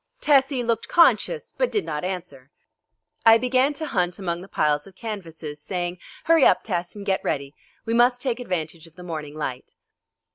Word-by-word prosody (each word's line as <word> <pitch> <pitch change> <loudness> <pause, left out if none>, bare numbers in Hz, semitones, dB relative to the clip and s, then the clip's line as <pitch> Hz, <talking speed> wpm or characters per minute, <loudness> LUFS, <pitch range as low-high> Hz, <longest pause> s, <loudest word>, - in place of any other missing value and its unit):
Tessie 270 -3 +3
looked 230 -1 -1
conscious, 455 +7 +3
but - - 0
did 420 - 0
not 150 +2 -4
answer. 180 -8 -6 0.7
I 225 0 +8
began 255 +3 +2
to 315 +2 -5
hunt 180 - -1
among 175 -3 -3
the 190 - -10
piles 150 -3 0
of 190 - -16
canvases, 165 -9 -7
saying, 175 +1 -3 0.2
"Hurry 330 -3 +4
up, 185 - +5
Tess, 175 -3 -3
and 205 -1 -8
get 190 -2 0
ready; 140 -1 -2 0.3
we 225 - -1
must 245 +1 +4
take 245 -2 -2
advantage 170 -7 -4
of 165 - -21
the 180 - -11
morning 155 -4 -6
light." 130 -5 -5
185 Hz, 180 wpm, -24 LUFS, 165-245 Hz, 0.7 s, I